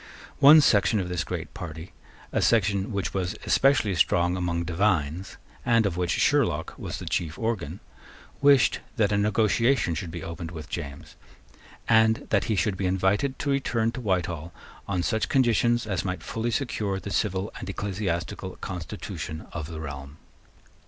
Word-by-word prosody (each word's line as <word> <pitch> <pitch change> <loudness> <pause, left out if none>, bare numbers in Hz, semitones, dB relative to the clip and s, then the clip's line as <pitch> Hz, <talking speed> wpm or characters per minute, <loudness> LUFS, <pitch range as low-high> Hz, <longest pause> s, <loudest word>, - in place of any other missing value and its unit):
One 150 +3 +9
section 110 -4 +3
of 90 -2 -3
this 90 -2 -1
great - - -5
party, 80 0 -8 0.4
a - - 0
section 100 -3 +2
which 100 -2 -2
was 95 -2 -2
especially 135 -7 +3
strong 90 0 +2
among 85 -2 -1
divines, 85 -1 0 0.3
and 115 -2 +3
of 95 -4 0
which 90 -1 -1
Sherlock - - +2
was - - -5
the - - -8
chief 80 -2 -2
organ, 100 -7 -3 0.6
wished 140 -2 +5 0.2
that 105 -5 +2
a 100 - +2
negotiation 110 0 +2
should 85 +2 -4
be 85 0 -6
opened 85 0 -6
with 80 -3 -8
James, 70 0 -6 0.7
and 110 -1 +4
that - - +2
he 110 - 0
should 100 -1 0
be 95 0 -1
invited 95 +8 +1
to 145 - -1
return 115 -4 +1
to 125 - -6
Whitehall 90 -6 -1 0.4
on 90 -3 -1
such 110 +2 0
conditions 120 -2 +3
as 95 -3 -2
might 90 -1 -4
fully 115 +1 -2
secure 110 -6 -1
the 100 +2 -7
civil 100 -1 -1
and 95 - -6
ecclesiastical 95 -2 -3
constitution 85 -3 -6
of 80 -3 -4
the 80 -2 -7
realm. 70 -1 -7
95 Hz, 160 wpm, -26 LUFS, 85-110 Hz, 0.7 s, One